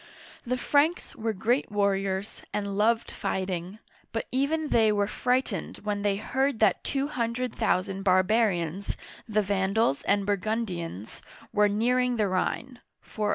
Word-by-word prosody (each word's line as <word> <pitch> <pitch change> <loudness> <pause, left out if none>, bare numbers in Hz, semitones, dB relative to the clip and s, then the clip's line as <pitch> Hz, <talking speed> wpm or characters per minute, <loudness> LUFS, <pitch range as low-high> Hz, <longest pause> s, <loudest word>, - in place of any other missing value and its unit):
The 255 +1 0
Franks 295 +7 +1
were 225 -3 -1
great 225 +5 0
warriors, 195 -1 0
and 200 -1 -2
loved 225 +3 +2
fighting, 185 -1 -3 0.3
but 225 - -2
even 295 +4 0
they 220 -2 +4
were 205 -1 +2
frightened 245 -3 -1
when 205 -1 -1
they 205 -1 +1
heard 265 +4 0
that 215 -4 +3
two 275 0 -1
hun 235 -5 -1
dred 250 -1 -2
thousand 190 +1 0
barbarians, 190 -2 +2 0.3
the 215 0 +2
Van'dals 195 -4 +1
and 200 0 +3
Burgun'dians, 190 - -3 0.3
were 210 0 +4
nearing 250 +4 +2
the 215 -3 +1
Rhine 235 +7 -2 0.2
(406). 210 -2 -2
210 Hz, 140 wpm, -27 LUFS, 195-235 Hz, 0.3 s, they